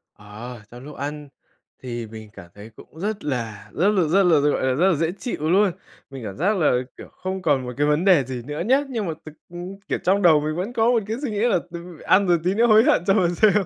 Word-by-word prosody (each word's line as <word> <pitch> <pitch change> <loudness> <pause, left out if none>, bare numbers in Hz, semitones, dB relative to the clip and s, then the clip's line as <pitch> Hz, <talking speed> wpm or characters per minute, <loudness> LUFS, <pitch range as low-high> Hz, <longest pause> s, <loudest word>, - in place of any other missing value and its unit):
Ờ, 110 +3 -10
trong 125 +1 -11
lúc 150 +1 -10
ăn 145 +1 -6 0.6
thì 120 -3 -5
mình 110 -1 -11
cảm 90 -5 -12
thấy 105 +2 -11
cũng 160 - -15
rất 205 +2 -3
là 110 -7 -4
rất 180 - +1
là 205 -3 +2
rất 195 +6 +3
là, 175 -3 +4
ta 145 - +2
gọi - - -1
là, 130 - +2
rất 170 +8 +2
là 170 - +2
dễ 165 +2 0
chịu 160 - -3
luôn. 195 +1 +4 0.4
Mình 135 -3 -9
cảm 100 -2 -7
giác 195 +8 +1
là, 160 - +3 0.3
kiểu, - - -10
không 190 +1 -5
còn 145 -6 +1
một 125 - -6
cái 145 +1 +2
vấn 150 +4 +1
đề 180 -8 +5
gì 130 -1 -6
nữa 150 +2 -5
nhá, 265 +5 +3
nhưng 230 -5 -3
mà 160 - -2
thực, 155 - -8 0.2
ừm 180 +3 -8
kiểu, - - -1
trong 195 +2 +2
đầu 165 -5 +6
mình 155 +1 -3
vẫn 190 +8 -4
có 230 -1 +2
một 230 -4 +1
cái 225 +2 -3
suy 255 - -2
nghĩ 205 - -3
là 230 -4 +2
"Từ 170 -1 -9
ăn 200 0 +3
rồi 175 -1 +3
tí 180 +2 +1
nữa 230 +3 +3
hối 220 0 +6
hận 170 - +3
cho 195 - +5
mà 185 -4 +3
xem." 205 +5 +3
170 Hz, 275 wpm, -22 LUFS, 135-195 Hz, 0.6 s, đầu